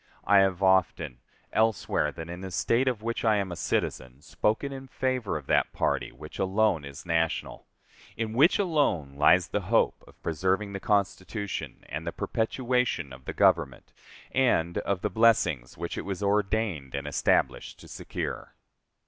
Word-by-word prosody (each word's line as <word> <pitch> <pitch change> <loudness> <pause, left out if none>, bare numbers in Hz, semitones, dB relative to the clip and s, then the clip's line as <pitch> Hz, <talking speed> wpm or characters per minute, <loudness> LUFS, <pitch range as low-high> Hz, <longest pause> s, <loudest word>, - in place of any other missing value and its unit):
I 100 -1 +5
have 95 -1 +2
often, 90 -8 +2 0.3
elsewhere 110 -8 +1
than 80 - -8
in 90 +1 -7
the 95 - -5
State 115 +9 +1
of 120 -4 -1
which 115 0 -2
I 110 -2 +4
am 100 -3 -1
a - - -4
citizen, 65 -3 -2
spoken 110 +6 -1
in 135 0 -8
favor 130 -8 -1
of 70 - -9
that - - +2
party - - 0
which 75 +5 -11
alone 95 -3 +2
is 70 +5 -10
national, 80 -1 -1 0.5
in 110 -1 -2
which 145 +9 +5
alone 145 - +1
lies 85 +5 +4
the 105 - -1
hope 110 +5 +1
of - - -19
preserving 95 +5 0
the 100 - -4
Constitution 100 0 -2
and - - -5
the - - 0
perpetuation 125 - -1
of 65 0 -13
the - - -4
Government - - +1 0.4
and 85 -10 +2
of 100 -2 -2
the - - -1
blessings 90 - +2
which 85 +1 -4
it - - -5
was 100 0 -4
ordained 100 - 0
and 70 0 -4
established 75 - 0
to - - -13
secure. - - -6
95 Hz, 165 wpm, -28 LUFS, 80-110 Hz, 0.5 s, I